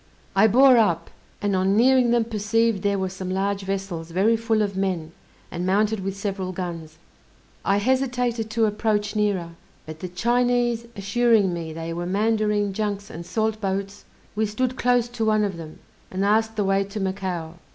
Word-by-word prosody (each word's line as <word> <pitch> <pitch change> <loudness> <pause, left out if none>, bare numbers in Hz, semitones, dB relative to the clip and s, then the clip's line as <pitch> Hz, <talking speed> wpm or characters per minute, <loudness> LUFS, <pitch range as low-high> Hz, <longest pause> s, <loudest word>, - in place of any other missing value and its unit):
I 200 +3 +6
bore 255 +3 +6
up, 170 -7 +1 0.3
and 200 -1 +1
on 190 +2 +2
nearing 255 +1 +5
them 235 -1 +3
perceived 225 -1 0
there 200 0 +1
were 190 -1 -1
some 185 0 -6
large 195 +1 -1
vessels, 190 -4 -4
very 195 +7 +2
full 225 -1 +1
of 200 -2 -3
men, 185 -5 -2 0.4
and 175 0 -4
mounted 210 +3 +1
with 195 +1 -4
several 195 -2 -3
guns. 170 -3 -6 0.7
I 195 - +2
hesitated 245 -1 0
to 220 +1 +2
approach 210 0 0
nearer; 200 -5 0 0.4
but 155 0 -9
the 185 - -5
Chinese 240 +3 +1
assuring 205 -1 +2
me 165 -2 -5
they 165 +1 -5
were 175 +1 -4
Mandarine 210 0 +1
junks 205 -1 -3
and 170 - -7
salt 220 -1 -1
boats, 195 0 -3 0.3
we 215 0 +1
stood 250 +5 -1
close 245 -1 +2
to 240 -2 -3
one 215 -1 +3
of 195 -4 -2
them, 155 -2 -9 0.3
and 190 +1 -1
asked 220 +2 +2
the 210 - 0
way 195 0 +2
to 200 +2 -6
Macao. 185 -4 -3
205 Hz, 175 wpm, -24 LUFS, 190-225 Hz, 0.7 s, I